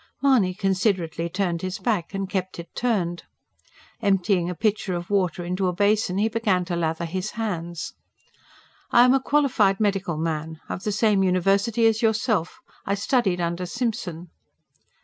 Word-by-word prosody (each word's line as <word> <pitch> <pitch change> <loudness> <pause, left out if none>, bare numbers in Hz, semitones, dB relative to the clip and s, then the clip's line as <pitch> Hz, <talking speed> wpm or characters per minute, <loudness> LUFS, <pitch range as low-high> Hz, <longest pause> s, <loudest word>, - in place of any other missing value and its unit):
Mahony 230 -10 +3
considerately 185 -4 0
turned 175 -2 -1
his 185 0 -3
back; 210 -8 -1
and 195 -1 -3
kept 185 -1 -3
it 170 0 -9
turned. 185 -8 -1 0.8
Emptying 195 -3 +2
a 180 - -4
pitcher 205 -1 0
of 175 +2 -6
water 180 -3 0
into 185 +2 -1
a 180 - 0
basin 205 0 +1
he 210 +2 +2
began 210 -5 0
to 175 -1 -3
lather 165 0 -1
his 185 +4 -3
hands. 175 -6 -4 1.0
"I 240 - +6
am 250 - +5
a 270 - +3
qualified 260 -10 +2
medical 195 -5 0
man. 160 0 -3
Of 185 - -5
the 210 - 0
same 210 -1 +2
university 195 +5 +2
as 225 0 +3
yourself. 220 -5 0 0.2
I 200 - 0
studied 200 -3 +1
under 170 +1 -2
Simpson." 185 -7 -3
190 Hz, 155 wpm, -24 LUFS, 175-215 Hz, 1.0 s, I